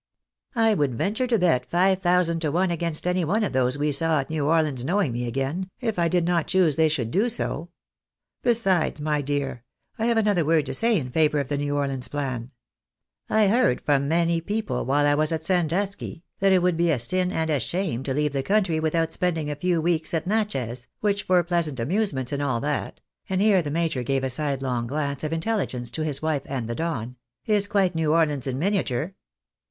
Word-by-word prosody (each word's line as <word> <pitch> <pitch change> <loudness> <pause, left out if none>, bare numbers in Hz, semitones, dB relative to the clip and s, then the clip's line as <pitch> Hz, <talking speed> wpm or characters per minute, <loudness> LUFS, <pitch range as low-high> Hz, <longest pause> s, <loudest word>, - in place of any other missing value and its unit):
I 225 -1 +4
would 145 - 0
venture 220 - -1
to 235 -2 +2
bet 165 - +2
five 185 +5 +2
thousand 175 -2 +2
to 155 -3 -1
one 180 +3 +1
against 170 -1 -3
any 180 0 +1
one 205 +8 +1
of 200 - -2
those 130 +1 +2
we 150 +1 0
saw 160 +1 +1
at 135 - -9
New 150 -3 -1
Orleans 155 -6 +1
knowing 180 0 +1
me 120 +1 -3
again, 135 +10 -2
if 225 -7 -2
I 170 - +3
did 175 0 +1
not 175 -2 +1
choose 180 -6 +3
they 160 0 +3
should 125 -7 -2
do 210 +7 +2
so. 175 -7 -2 0.7
Besides, 195 -11 +1
my 150 0 0
dear, 140 -4 -3 0.4
I 225 - 0
have 235 -1 +2
another 205 -6 +2
word 155 0 +2
to - - -4
say 230 -1 +2
in 130 -6 -4
favour 150 0 +2
of 140 -2 -3
the 145 - -1
New 145 0 -1
Orleans 135 -3 -1
plan. 130 -5 -4 0.8
I 220 -1 +4
heard 205 - +3
from 140 -1 +1
many 170 +1 +1
people, 210 +4 -2
while 145 +2 +2
I 145 - +4
was 155 +2 +1
at 160 - -2
Sandusky, 180 0 -1 0.2
that 195 0 +3
it 185 -2 +4
would 180 -2 +2
be 170 0 +2
a 155 - +2
sin 180 +10 +1
and 160 -2 -1
a 145 - +2
shame 140 - -2
to 135 0 -3
leave 150 -1 0
the 135 - 0
country 190 -1 +1
without 160 +1 0
spending 160 -4 -1
a - - -3
few 175 +2 0
weeks 165 0 0
at 165 - -1
Natchez, 135 - -2
which 205 -1 +1
for 180 -1 +4
pleasant 170 -6 -1
amusements 140 - -1
and 140 0 -2
all 130 -5 0
that 145 0 -3
" - - -37
(and 190 -1 0
here 200 -2 +4
the 150 - -4
major 160 -3 -1
gave 135 +2 -1
a 130 - 0
sidelong 130 -4 -1
glance 140 +1 -3
of 155 - -2
intelli 200 +6 0
gence 120 -2 -4
to 155 - -3
his 150 -2 -2
wife 155 -3 0
and 130 -5 -3
the 120 - -3
Don) 125 -5 -3
" 120 0 -65
is 205 -2 +2
quite 195 -3 +2
New 160 -2 0
Orleans 150 -5 +1
in 130 -1 -2
miniature. 170 -3 -1
160 Hz, 220 wpm, -24 LUFS, 140-185 Hz, 0.8 s, I